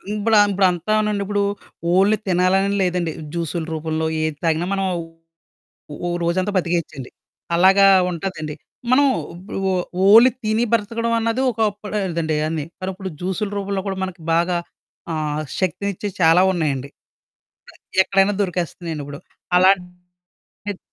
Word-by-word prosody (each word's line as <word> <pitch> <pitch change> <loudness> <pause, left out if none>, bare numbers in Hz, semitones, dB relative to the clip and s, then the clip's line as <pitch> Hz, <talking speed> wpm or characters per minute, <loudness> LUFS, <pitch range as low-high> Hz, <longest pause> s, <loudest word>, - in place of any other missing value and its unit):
ఇంప్లా 215 +1 +2
ఇప్పుదంతానండి 200 +2 +1
ఇప్పుడు 205 0 0 0.5
ఓన్లీ 200 +3 +4
తినాలనే 185 +2 +2
లేదండి. 175 -3 0 0.2
జ్యూసులు 170 -1 -3
రూపంలో 160 0 -2 0.2
ఏది 155 -1 -1
తాగినా 165 +1 +1
మనం 195 0 0 1.1
ఓ - - -6
ఓ - - 0 0.2
రోజంతా 185 +4 0
బ్రతికేయొచ్చండి. 170 -7 -2 0.5
అలాగా 190 +3 +6 0.3
ఉంటదండి 160 -3 -5 0.4
మనం 270 +3 +5 0.4
బ - - -11 0.2
ఓ - - +1 0.3
ఓన్లీ 225 +5 +8
తిని 215 +2 +1
బ్రతకడం 230 +1 0
అన్నది 230 +2 0
ఒక్కపుడదండి 205 -7 -2
అన్ని. 155 -2 -3 0.2
మరిప్పుడు 190 +1 -5
జ్యూసు‌లు 190 +3 -2
రూపంలో 200 -1 -2
కూడా 190 -1 -3
మనకి 185 -2 -6
బాగా 175 +1 +2 0.6
ఆహ్, 155 -1 -2 0.2
శక్తినిచ్చే 200 +3 -2
చాలా 165 +2 +6
ఉన్నాయండి. 145 -6 -2 0.8
అ - - -18 0.3
ఎక్కడైనా 195 +1 +2
దొరికేస్తున్నాయండి 170 -4 -3
ఇప్పుడు 145 +1 -9 0.4
అలాంటియి 180 -1 +3 0.8
ఎత్ 190 - -14
185 Hz, 120 wpm, -21 LUFS, 165-200 Hz, 1.1 s, ఓన్లీ